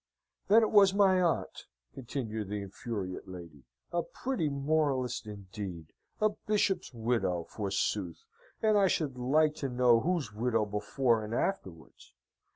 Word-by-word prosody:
"Then 225 +3 +6
it 220 - +1
was 200 -2 +6
my 190 -2 +4
aunt," 170 -2 -1 0.3
continued 115 -5 -5
the 105 -1 -3
infuriate 100 -2 -5
lady. 85 -7 -10 0.3
"A 175 - +1
pretty 250 - -2
moralist, 140 -5 0
indeed! 95 -5 -8 0.3
A 215 - +4
bishop's 205 -5 -1
widow, 115 -7 -1
forsooth, 100 -2 -2 0.4
and 215 -1 +4
I 195 - +5
should 150 -6 -1
like 150 +5 +3
to 135 - -3
know 125 -2 +4
whose 160 -7 -1
widow 115 0 +1
before 110 +3 0
and 110 +2 -4
afterwards. 95 - -4
120 Hz, 135 wpm, -31 LUFS, 105-160 Hz, 0.4 s, Then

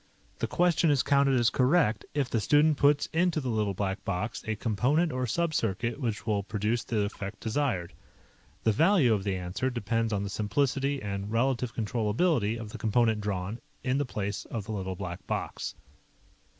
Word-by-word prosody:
The - - 0
question 175 -1 +3
is 140 -3 +3
counted 140 -2 +3
as 120 0 +3
correct 130 -2 +2
if 140 -3 +1
the 120 - 0
student 145 +7 +4
puts 145 0 +4
into 170 -1 +2
the 130 -4 -3
Little 105 -3 0
Black 95 0 -2
Box 100 +4 -3
a 110 - 0
component 125 +10 +1
or 130 0 -1
subcircuit 120 - -1
which 115 -6 -2
will 105 -3 +1
produce 105 +3 -1
the 110 -3 -1
effect 100 0 -5
desired. 110 -7 -1 0.7
The 110 - +4
value 155 - +4
of 100 -3 -1
the 100 -1 -1
answer 90 +8 -2
depends 115 -1 -1
on 100 -1 0
the 100 - -3
simplicity 135 +6 0
and 100 0 -4
relative 125 +1 0
controllability 115 - +1
of 110 -2 -7
the 120 - -8
component 110 -1 +2
drawn 100 +2 -3 0.2
in 130 +1 +1
the - - +2
place 100 -3 -3
of 110 -4 -5
the - - -6
Little 95 -3 -3
Black 90 -2 -6
Box. - - -3
115 Hz, 175 wpm, -29 LUFS, 105-135 Hz, 0.7 s, student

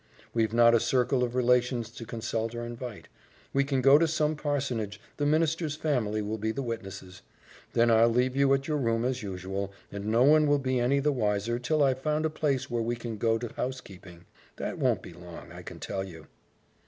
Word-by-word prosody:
We've 110 -2 +1
not 115 0 +6
a 115 - +5
circle 125 +2 +1
of 120 0 -2
relations 125 -2 +2
to 115 -1 -9
consult 115 0 -3
or 120 0 -4
invite. 120 -2 -7 0.5
We 140 - +3
can 135 -2 -1
go 135 +2 +7
to 165 - +3
some 155 -1 +1
parsonage, 130 -8 -2 0.2
the 145 - +1
minister's 155 0 +1
family 120 -9 -1
will 110 +2 -3
be 110 +1 -1
the 135 +4 -3
witnesses; 95 -5 -7 0.5
then 115 0 +4
I'll 115 +1 +6
leave 125 +2 +1
you 140 0 +3
at 135 0 -4
your 155 -2 0
room 115 -2 0
as 130 0 -1
usual, 95 0 -4 0.2
and 100 0 -5
no 115 +3 +3
one 150 +2 +5
will 145 0 +4
be 130 -2 0
any 130 +4 +2
the 150 +2 +2
wiser 110 -1 0
till 145 +5 +1
I've 130 -1 +1
found 155 +2 0
a 160 - 0
place 140 -4 -1
where 120 -1 -1
we 120 +1 -1
can 115 -2 -6
go 115 +1 +2
to 115 0 -6
housekeeping. 95 -9 -7 0.3
That - - -4
won't - - +1
be - - -10
long, 85 0 -11
I - - -9
can - - -10
tell 95 -1 -3
you." 80 -5 -10
120 Hz, 210 wpm, -28 LUFS, 110-135 Hz, 0.5 s, go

